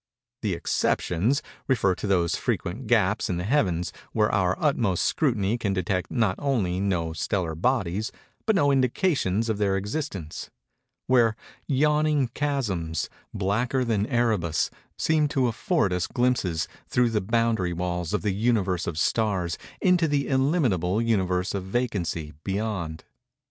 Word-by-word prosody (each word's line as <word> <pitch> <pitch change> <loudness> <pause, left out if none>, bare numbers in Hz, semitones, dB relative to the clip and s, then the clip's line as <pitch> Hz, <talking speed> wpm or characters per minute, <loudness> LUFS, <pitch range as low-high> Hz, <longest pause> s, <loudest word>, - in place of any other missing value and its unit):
The 100 -5 0
"exceptions" 100 - 0 0.2
refer 115 -8 +3
to 100 - -5
those 90 -4 +2
frequent - - -3
gaps - - +2
in 90 - -1
the 90 - -2
Heavens, 95 - +1 0.2
where 105 -1 +2
our 95 -2 +1
utmost 115 - +1
scrutiny 115 -6 +1
can 100 -4 0
detect 95 0 -1
not 110 -6 +1
only 110 -11 0
no 90 -5 0
stellar 85 +1 -1
bodies, 105 +1 0 0.4
but 220 - +4
no 145 -5 +4
indications 130 - +1
of 110 -2 -1
their 100 -2 +2
existence:—where 110 - -2 0.3
yawning 150 -1 +2
chasms, 105 - -2 0.2
blacker 120 +7 0
than 110 -3 0
Erebus, 110 - +1 0.3
seem 155 -2 +2
to 135 -3 +1
afford 100 -4 +1
us 90 -1 0
glimpses, 120 -11 0 0.2
through 120 -1 +2
the 105 -2 +1
boundary 115 -3 +1
walls 90 -1 -2
of 105 -2 -1
the 105 -2 +1
Universe 100 -5 +1
of 85 - -3
Stars, 95 -2 +1 0.3
into 180 -3 +4
the 145 -2 0
illimitable 130 - +2
Universe 95 -5 +1
of 100 -2 -2
Vacancy, 95 -9 -2
beyond. 95 -6 -3
105 Hz, 135 wpm, -26 LUFS, 90-125 Hz, 0.4 s, but